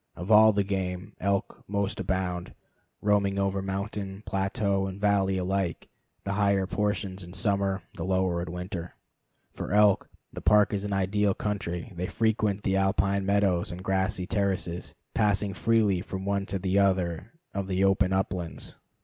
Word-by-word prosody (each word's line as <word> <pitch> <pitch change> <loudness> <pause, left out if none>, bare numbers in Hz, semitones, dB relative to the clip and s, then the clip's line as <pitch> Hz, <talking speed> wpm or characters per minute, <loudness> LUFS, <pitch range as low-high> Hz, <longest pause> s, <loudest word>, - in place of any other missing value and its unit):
Of 90 +5 -4
all 110 +1 +8
the 100 -1 +1
game, 95 -2 -3
elk 100 0 -1
most 100 0 -1
abound, 90 -2 -2 0.5
roaming 100 -1 +2
over 100 0 0
mountain, 95 +1 -4
plateau, 95 0 0
and 95 +1 -7
valley 100 -2 +2
alike, 95 -1 -2 0.3
the 100 - -3
higher 100 -2 +2
portions 100 -1 -2
in 90 0 -10
summer, 100 -3 +1
the 80 - -5
lower 95 -1 +1
in 85 -1 -5
winter. 90 -1 -6 0.6
For - - -5
elk, 105 -1 +4 0.2
the - - -6
park 105 -1 +4
is 100 0 -1
an 100 - -3
ideal 100 +1 +1
country. 95 -1 -3
They 90 +2 -2
frequent 105 -1 0
the 95 0 +1
alpine 95 0 +1
meadows 100 -3 +2
and 90 +1 -7
grassy 95 -1 0
terraces, 95 -3 -1 0.2
passing 105 -1 +2
freely 105 -2 +2
from 95 -1 -6
one 100 0 -1
to 100 - -2
the 95 +1 +1
other 95 0 +1 0.2
of 100 -1 -3
the 95 0 +1
open 95 -1 +3
uplands. 90 -3 -2
95 Hz, 160 wpm, -28 LUFS, 95-100 Hz, 0.6 s, all